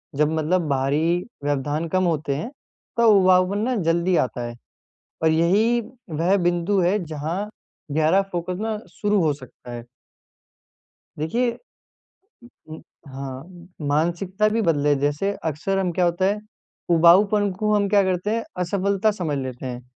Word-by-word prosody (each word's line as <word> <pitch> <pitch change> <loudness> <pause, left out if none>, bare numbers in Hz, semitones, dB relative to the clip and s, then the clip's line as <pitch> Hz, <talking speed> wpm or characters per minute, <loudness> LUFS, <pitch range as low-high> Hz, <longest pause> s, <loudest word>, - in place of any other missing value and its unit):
जब 150 +2 +2
मतलब 165 +4 +1
बाहरी 150 +6 +1 0.2
व्यवधान 145 +3 -1
कम 185 +2 +1
होते 155 -5 0
हैं, 155 - -4 0.5
तब 235 -1 +5
उबाऊपन 185 -1 +4
ना 255 - 0
जल्दी 170 +2 +2
आता 120 0 -6
है 120 - -8 0.7
और 160 - +5
यही 200 +9 +3 0.3
वह 170 +5 +1
बिंदु 175 +3 +1
है 180 +4 +2
जहाँ 160 +6 -4 0.4
गहरा 160 +6 +3
फ़ोकस 175 +1 -3
ना 220 -1 -2 0.2
शुरू 205 -2 +2
हो 155 -2 +2
सकता 130 -3 -13
है। 120 -1 -6 1.4
देखिए 235 +11 0 1.2
उ, 155 - -8
उम, - - -12 0.3
हाँ। 140 +7 -9 0.2
मानसिकता 175 +7 +1
भी 225 +2 0
बदले, 150 -6 +2
जैसे 145 +8 0
अक्सर 160 +5 -1
हम 185 -2 0
क्या 180 +1 +1
होता 175 +2 +1
है, 205 +2 +1 0.5
उबाऊपन 195 +5 +5
को 210 0 +1
हम 205 -1 +2
क्या 205 0 +5
करते 185 +2 -1
हैं 230 - -2 0.2
असफलता 200 +3 +1
समझ 170 -8 -3
लेते 130 -1 -5
हैं। 125 -1 -5
175 Hz, 145 wpm, -23 LUFS, 150-195 Hz, 1.4 s, तब